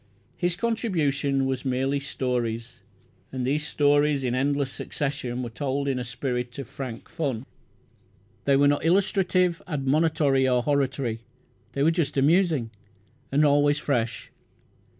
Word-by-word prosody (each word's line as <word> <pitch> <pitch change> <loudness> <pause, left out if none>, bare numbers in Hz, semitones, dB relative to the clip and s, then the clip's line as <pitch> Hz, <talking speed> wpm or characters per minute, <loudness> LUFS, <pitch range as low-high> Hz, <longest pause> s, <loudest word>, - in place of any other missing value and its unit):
His 175 -1 0
contribution 155 - 0
was 130 -1 -2
merely 135 +2 0
"stories", 125 -4 -3 0.5
and 130 -1 -3
these 150 +3 0
stories 145 -1 +2
in 125 -2 0
endless 140 +1 0
succession 130 -4 -3
were 120 - -5
told 140 +4 -2
in 135 -2 0
a - - -3
spirit 125 0 -3
of 135 -4 -6
frank 125 -3 -7
fun. 135 -6 -3 1.0
They 140 - +4
were 140 +1 +5
not 145 0 +2
illustrative, 185 -1 +2
admonitory, 145 -2 +2
or 125 -1 +2
hortatory. 135 -5 0 0.5
They 140 - 0
were 160 - +5
just 165 -5 -1
amusing, 150 -4 +3 0.6
and 145 +2 +4
always 145 0 +4
fresh. 115 -8 -2
140 Hz, 130 wpm, -26 LUFS, 130-150 Hz, 1.0 s, were